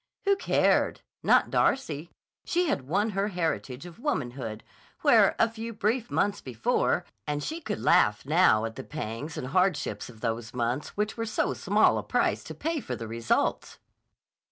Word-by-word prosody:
Who 400 0 +4
cared? 390 - +2 0.2
Not - - +4
Darcy. 165 - +1 0.3
She 355 +1 +1
had 130 -2 -1
won 205 +8 +1
her 195 +1 0
heritage 165 -7 -3
of 175 +2 -11
womanhood. 125 - -3 0.4
Where, - - +5
a 225 - +4
few 230 0 -6
brief 225 +3 0
months 205 0 0
before—and 140 +4 -1
she 325 +2 -4
could 215 -9 -4
laugh 120 -13 +3
now 145 -8 +4
at 115 0 -6
the 135 - -5
pangs 145 +1 -6
and - - -4
hardships 155 - 0
of 115 -3 -14
those 115 0 -3
months 125 +7 -2
which 210 +2 -1
were 225 0 -2
so 215 - 0
small - - +3
a - - -5
price - - 0
to - - -7
pay 325 0 -2
for 130 - -5
the 115 -1 -6
results! 115 +1 -1
155 Hz, 165 wpm, -28 LUFS, -, 0.4 s, Where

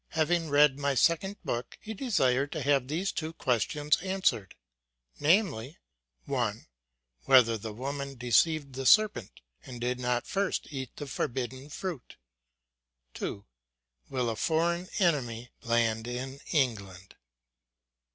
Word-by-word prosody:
Having 165 +1 +1
read 145 -1 +5
my 140 -1 0
second 190 +8 +2
book, 120 -6 -4
he 220 - -7
desired 140 - +1
to 155 - -3
have 140 -2 +2
these 170 +7 -1
two 160 0 -4
questions 145 +2 +1
answered, 185 - 0 0.6
viz. 155 - +2 0.5
I. - - -1 0.6
Whether 125 -4 +6
the 110 0 -6
woman 140 +4 -5
deceived 140 +4 +2
the 130 0 -2
serpent, 215 - +3 0.2
and 125 -2 -9
did 125 +1 -1
not 125 -1 0
first 200 -1 -1
eat 130 -4 -6
the 145 - -6
forbidden 130 +1 -4
fruit? 170 -2 -6 1.0
2. 100 - -5 0.6
fp 130 -2 -2
7/7 120 - 0
a - - -4
foreign 170 +7 0
enemy 125 - 0
land 115 -1 +1
in 130 +3 -5
England 100 - -1
135 Hz, 125 wpm, -29 LUFS, 120-160 Hz, 1.0 s, Whether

